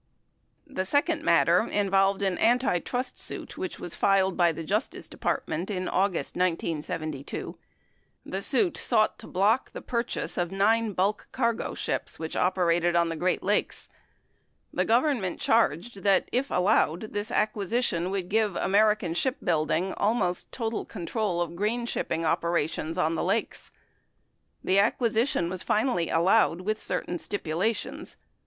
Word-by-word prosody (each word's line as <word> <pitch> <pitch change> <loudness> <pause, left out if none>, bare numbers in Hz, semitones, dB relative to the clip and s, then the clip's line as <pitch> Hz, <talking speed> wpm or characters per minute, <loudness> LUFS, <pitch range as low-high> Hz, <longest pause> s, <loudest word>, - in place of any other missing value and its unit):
The 270 -11 -3
second 285 +10 +1
matter - - +4
involved 195 -1 +2
an 190 -2 0
antitrust 245 +1 +1
suit - - -4
which - - -5
was - - -6
filed 190 -1 +2
by 175 -2 +4
the 165 +1 -6
Justice 155 - -2
Department 170 +6 -3
in 185 -3 -2
August 190 -2 0
1972. 165 -4 -3 0.7
The - - -4
suit 370 -6 +2
sought 215 -3 +2
to - - -10
block 205 +7 +1
the - - -7
pur 235 -2 0
chase 235 - -3
of 175 0 -1
nine 215 +3 +2
bulk 195 +3 0
earsro 235 -3 -1
ships - - -3
which 160 -1 -5
operated 175 -2 +2
on 170 -1 +3
the 165 - -3
Great 180 +3 0
Lakes. 205 +2 -1 0.8
The - - +1
Government 235 - +1
charged 225 -1 +1
that, 195 0 +3
if 265 +3 0
allowed, 180 +1 +1
this 205 +2 -3
acquisition 210 -4 0
would 190 -2 -3
give 210 -1 +1
American 210 -3 +2
Ship 260 - 0
Building 165 +3 0
almost 205 -5 0
total 225 -2 -3
control 190 -1 -2
of 170 - -8
grain 220 +6 -1
shipping 165 -7 -2
opera 170 -1 +1
tions 160 +1 -5
on 165 -2 +1
the 165 - -1
lakes. 200 +6 -2 0.9
The 190 +1 +3
acquisition 225 -2 +1
was 185 +1 -5
finallv 210 -7 +1
allowed 180 +1 +3
with 215 +3 -2
certain 175 -1 -2
stipulations. 200 +3 -3
195 Hz, 145 wpm, -27 LUFS, 175-220 Hz, 0.9 s, matter